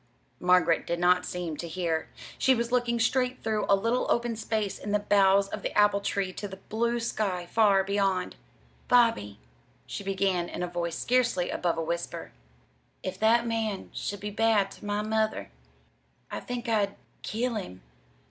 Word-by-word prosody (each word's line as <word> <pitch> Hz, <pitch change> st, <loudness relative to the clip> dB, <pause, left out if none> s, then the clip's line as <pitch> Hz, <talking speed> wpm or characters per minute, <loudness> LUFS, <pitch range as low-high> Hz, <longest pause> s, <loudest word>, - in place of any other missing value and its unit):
Margaret 180 Hz, -2 st, +3 dB
did 170 Hz, -, -1 dB
not 180 Hz, +1 st, +3 dB
seem 175 Hz, -4 st, -4 dB
to 170 Hz, -, -5 dB
hear. 165 Hz, -1 st, -2 dB, 0.3 s
She 265 Hz, -, +4 dB
was 235 Hz, 0 st, -2 dB
looking 240 Hz, -1 st, +1 dB
straight 250 Hz, +2 st, +1 dB
through 220 Hz, -1 st, 0 dB
a 200 Hz, -, +7 dB
little 230 Hz, +5 st, 0 dB
open 235 Hz, -1 st, +1 dB
space 215 Hz, -2 st, -2 dB
in 205 Hz, -, -4 dB
the -, -, +5 dB
boughs 200 Hz, -1 st, +4 dB
of -, -, -5 dB
the -, -, -3 dB
apple 205 Hz, -1 st, +5 dB
tree 200 Hz, -2 st, -2 dB
to 205 Hz, -, -5 dB
the 190 Hz, -1 st, -9 dB
blue 235 Hz, +4 st, -1 dB
sky 200 Hz, -6 st, -2 dB
far 200 Hz, 0 st, +4 dB
beyond. 195 Hz, -2 st, 0 dB, 0.5 s
"Bobby," 225 Hz, -, +3 dB, 0.5 s
she -, -, -6 dB
began 190 Hz, -3 st, 0 dB
in 180 Hz, -, -4 dB
a -, -, -1 dB
voice 170 Hz, -1 st, -3 dB
scarcely 245 Hz, -7 st, +1 dB
above 170 Hz, -2 st, -1 dB
a 165 Hz, -, -1 dB
whisper, 170 Hz, +2 st, -4 dB, 0.7 s
"if 185 Hz, 0 st, -4 dB
that 230 Hz, +2 st, +4 dB
man 225 Hz, -4 st, -2 dB
should 205 Hz, -1 st, -4 dB
be 210 Hz, 0 st, -4 dB
bad 210 Hz, -2 st, +2 dB
to -, -, -12 dB
my 205 Hz, 0 st, -1 dB
mother 220 Hz, 0 st, -1 dB, 0.8 s
I -, -, -3 dB
think 245 Hz, -1 st, -5 dB
I'd 205 Hz, -3 st, +1 dB, 0.3 s
kill 235 Hz, +3 st, -2 dB
him." 185 Hz, -, -6 dB
205 Hz, 170 wpm, -28 LUFS, 180-225 Hz, 0.8 s, a